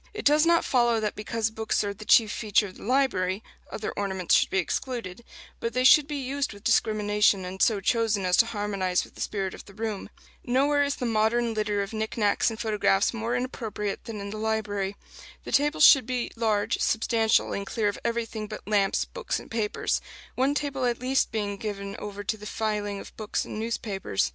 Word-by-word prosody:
It 425 - -6
does 300 +3 +5
not 335 0 +4
follow 240 -3 +3
that 210 -1 -2
because 220 +1 -2
books 220 -1 -1
are 200 0 -2
the 215 +2 -11
chief 220 -1 +5
feature 210 -1 +1
of 190 - -10
the - - -12
library, 215 -6 +1 0.3
other 215 - -4
ornaments 190 -3 -1
should - - +4
be - - -1
excluded; 230 +1 -3 0.4
but 230 - -3
they 255 - +1
should 285 +2 +7
be 300 - -4
used 275 -1 -2
with 200 0 -14
discrimination, 210 -4 +2
and 185 +1 -6
so 215 -3 +4
chosen 215 -1 +1
as 180 0 +3
to 230 - +5
harmonize 200 -4 -1
with - - -14
the - - -10
spirit 195 -3 -2
of - - -11
the 200 - -15
room. 215 -2 -4 0.3
Nowhere 280 +4 +2
is 285 0 -1
the 250 - -4
modern 230 +1 +1
litter 210 -2 0
of 200 - -8
knick 220 +1 -3
knacks 210 +1 +2
and 225 -1 -7
photographs 210 -3 +2
more 230 +1 -2
inappropriate 225 -5 -4
than 225 -3 -6
in 200 0 -6
the 215 - -5
library. 205 -3 -1 0.5
The - - -7
tables 295 +2 +3
should 265 -5 +7
be 250 -2 -2
large, 220 -3 0
substantial, 225 0 +2
and 200 - -2
clear 215 0 0
of 205 - -2
everything 230 -2 -2
but 215 -1 -9
lamps, 200 -2 +2
books - - -3
and - - -14
papers 220 -2 -1 0.3
one 270 +3 +1
table 275 -3 -1
at 240 -1 0
least 260 +2 +1
being 205 -2 -2
given 200 -1 -5
over 205 0 -6
to 220 +2 -2
the 210 0 -9
filing 205 -2 -2
of - - -11
books 215 -1 -2
and 215 - -6
newspapers. 210 - -2
220 Hz, 205 wpm, -26 LUFS, 205-235 Hz, 0.5 s, should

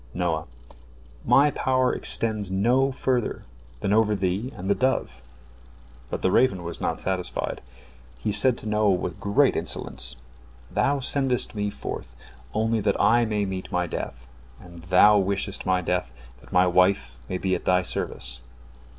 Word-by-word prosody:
Noah: - - -1 0.8
"My 145 +2 +4
power 130 -2 +1
extends 110 -4 +1
no 120 +8 +2
further 130 -2 -1 0.4
than 100 - 0
over 105 -1 +3
thee 95 +6 -2
and 90 - -7
the 100 - +4
dove." 100 - -1 0.9
But - - -5
the 95 - +2
raven 95 -8 +2
was 85 0 -6
not - - -1
satisfied. 95 -1 -2 0.6
He 105 - -2
said 115 +4 +5
to - - -5
Noah 105 -1 +2
with 90 - -4
great 100 0 +2
insolence: 60 0 -3 0.6
"Thou 140 0 +1
sendest 130 -2 +1
me 105 -1 -2
forth - - -7 0.4
only 110 +1 0
that 100 -1 0
I 120 +1 +4
may 105 -2 -1
meet 95 -1 -5
my 90 0 0
death, 60 -6 -6 0.3
and 85 -1 -13
thou 100 +4 +6
wishest 100 0 -2
my 90 -1 +2
death 90 -4 -1 0.3
that - - -19
my 90 0 +4
wife 90 -9 +2
may 90 - -2
be 95 0 -1
at 90 - -3
thy 90 0 +3
service." 60 -7 -3
100 Hz, 155 wpm, -25 LUFS, 90-115 Hz, 0.9 s, thou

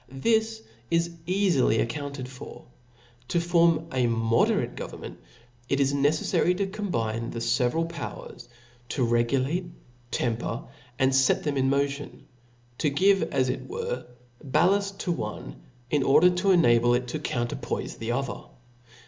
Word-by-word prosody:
This 220 - 0 0.3
is 170 0 +1 0.2
eafily 180 - +2
' - - +4
accounted 140 +1 -5
for. 130 0 -11 0.6
To 170 - +1
form 170 -2 +3
a 125 -2 +2
moderate 115 0 +1
government, - - -8 0.5
it 140 - +1
is 140 0 +2
neceffary 150 +5 +2
to 200 - 0
combine 115 - -3
the - - -6
feveral 120 +7 +1
powers; 165 -7 -8 0.4
to 130 -1 0
regulate^ 130 +9 0 0.4
temper, 120 +1 -2 0.3
and 130 -1 +3
iet 135 0 +3
them 150 -2 -1
in 135 -1 +2
motion; 140 +1 -2 0.5
to 150 - +2
give, 195 +7 +3
as 130 -1 +1
it - - -4
were^ 470 +5 -4 0.4
ballaft 190 +8 +2
to 185 - -2
one, - - -5 0.4
in 145 - +3
order 155 +7 +5
to 180 +2 0
enable 120 -10 +5
► 120 - +5
it 125 0 -5
to 155 - -3
coumerpoife 120 -5 -3
the 115 +1 -3
other. 135 +1 -3
140 Hz, 140 wpm, -26 LUFS, 120-175 Hz, 0.6 s, order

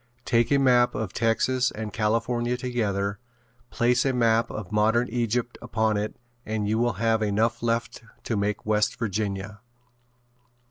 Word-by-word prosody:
Take 115 +1 +2
a 140 - +5
map 125 -3 +4
of 105 -3 -3
Texas 125 +2 +1
and 110 -1 -6
California 115 +3 0
together, 105 -5 -2 0.5
place 125 +1 +2
a 135 - +1
map 115 -2 +2
of 105 -3 -7
modern 110 +3 +2
Egypt 120 +1 -1
upon 110 -1 0
it 105 +1 -2 0.3
and 110 -1 -2
you 110 +2 +1
will 120 0 +1
have 115 -1 +1
enough 110 +3 +1
left 115 0 -1 0.2
to 115 - -2
make 100 0 -1
West 105 0 +1
Virginia. 105 -1 -3
115 Hz, 145 wpm, -25 LUFS, 105-120 Hz, 0.5 s, a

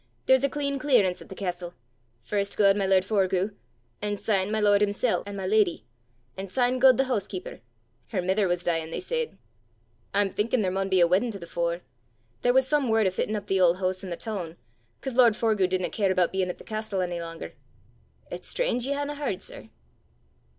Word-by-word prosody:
There's 260 0 +4
a 280 - +3
clean 280 -1 -2
clearance 235 -11 +2
at - - -13
the 190 - -8
castel. 180 -2 -4 0.5
First 200 - -2
gaed 200 -2 +5
my 200 -2 0
lord 190 -1 +4
Forgue, 195 -1 +1 0.5
an' 205 0 -2
syne 195 -2 0
my 220 - 0
lord 205 -1 +4
himsel' 210 +3 +1
an' 200 - -6
my 190 - -4
leddy, 185 - +2 0.5
an' 195 +1 -6
syne 250 +5 +1
gaed 260 -2 +7
the 270 - +4
hoosekeeper 200 -7 -3 0.5
her 200 - -2
mither 190 +3 +1
was 175 0 -1
deein', 165 -2 -1
they - - -4
said. 475 +4 -3 0.7
I'm 200 -1 +1
thinkin' 220 +3 0
there 185 - 0
maun 195 +1 -1
be 190 -1 +3
a - - +7
weddin' 190 +8 +2
to - - -5
the 170 - -9
fore. 170 +1 -2 0.6
There 245 - +3
was 265 +1 +3
some 290 -3 +1
word 220 -1 +3
o' 190 - +2
fittin' 210 +3 -2
up 205 -1 -4
the 195 -2 +1
auld 175 0 +5
hoose 185 0 -1
i' 190 - -6
the 170 - -4
toon, 180 -7 -5 0.4
'cause 265 - -4
lord 235 -3 +5
Forgue 215 -5 +1
didna 185 -2 -1
care 200 -3 +1
aboot 180 -2 +2
bein' 190 -1 -1
at 180 - -4
the - - -13
castel 215 -3 -3
ony 175 -1 -3
langer. 165 -1 -7 0.8
It's - - -4
strange 255 - 0
ye 280 - 0
haena 285 +1 -2
h'ard, 275 -11 -2
sir!" - - -6
200 Hz, 210 wpm, -26 LUFS, 185-235 Hz, 0.8 s, gaed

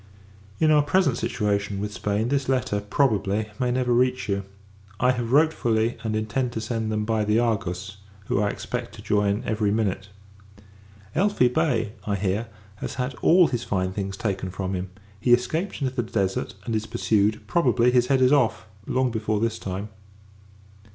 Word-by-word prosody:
In 155 -1 +4
our 150 -1 +6
present 145 -3 +2
situation 100 -2 -1
with 105 0 -4
Spain, 105 +3 -1
this 135 -1 0
letter, 125 -6 +1
probably, 105 -2 0
may 125 - +1
never 125 0 +1
reach 125 +1 +2
you. 100 -1 -1 0.5
I 125 +1 +4
have 120 -2 -3
wrote 155 +3 +5
fully; 115 -2 0
and 110 -1 -1
intend 120 +4 -1
to 110 - -2
send 110 0 -2
them 105 0 -1
by 110 -1 +1
the 105 +1 +2
Argus, 100 -4 -1 0.3
who 100 - 0
I 105 - +1
expect 120 +2 -5
to 105 - -11
join 105 +1 +1
every 110 -1 0
minute. 100 -2 -1 1.1
Elphi 185 -9 +3
Bey, 150 -9 +1 0.2
I 100 - +1
hear, 100 +3 -1 0.3
has - - -5
had 125 +1 -2
all 175 0 +6
his 120 -2 -2
fine 95 -2 -1
things 95 0 -4
taken 95 -3 -2
from 95 +1 -4
him. 90 0 -3 0.3
He 120 +3 +4
escaped 160 +10 0
into 130 -1 -1
the 125 - 0
Desert, 100 -6 -2
and 115 - -1
is 110 0 -2
pursued; 110 -2 +1
probably, 125 -8 +3
his 125 -1 +3
head 135 -1 +3
is 130 0 +5
off, 115 -10 +2 0.2
long 130 -1 +1
before 110 -1 -1
this 115 0 -1
time. 95 +2 -5
110 Hz, 180 wpm, -25 LUFS, 105-125 Hz, 1.1 s, our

